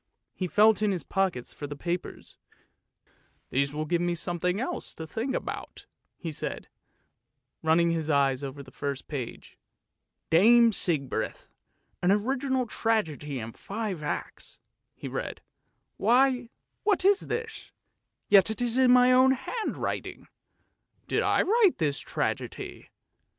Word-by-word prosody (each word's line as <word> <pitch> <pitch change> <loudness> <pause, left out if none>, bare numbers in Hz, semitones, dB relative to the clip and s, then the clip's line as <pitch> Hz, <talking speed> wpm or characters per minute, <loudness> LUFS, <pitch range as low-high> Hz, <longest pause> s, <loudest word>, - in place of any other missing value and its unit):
" - - -55
He 185 - -3
felt 215 +4 +4
in 210 -1 +2
his 180 -3 -2
pockets 190 -10 -1
for 145 - -6
the 145 - -6
papers. 175 +4 -5 0.6
" - - -38
These 140 +1 +1
will 155 +1 -3
give 170 +2 0
me 175 0 0
something 175 +2 -1
else 260 - -4
to 160 - -6
think 235 - -3
about," - - -6 0.3
he 165 - -5
said, 150 - -5 0.9
running 165 +2 +3
his 160 -2 -2
eyes 140 -2 +2
over 140 +1 -6
the 135 - -15
first 140 -2 -4
page. 130 -6 -7 0.2
" - - -57
' - - -55
Dame 230 +7 +6
Sigbrith,' 155 -9 -2 0.5
an 180 - +3
original 260 +5 +1
tragedy 160 - -1
in 115 -1 -5
five 200 - -5
acts," 150 - -5 0.4
he - - -7
read. - - -4 0.3
" - - -50
Why, 250 +2 +3 0.3
what 410 -3 +1
is 400 0 +4
this, 460 -1 -5 0.6
yet 195 0 +6
it 220 - -4
is 245 +1 0
in 260 -1 +5
my 250 0 +6
own 260 +1 +6
handwriting. 270 - -4 0.8
Did - - +1
I - - +3
write 415 -1 +3
this 145 -5 0
tragedy? - - -4
190 Hz, 145 wpm, -28 LUFS, 155-250 Hz, 0.9 s, Dame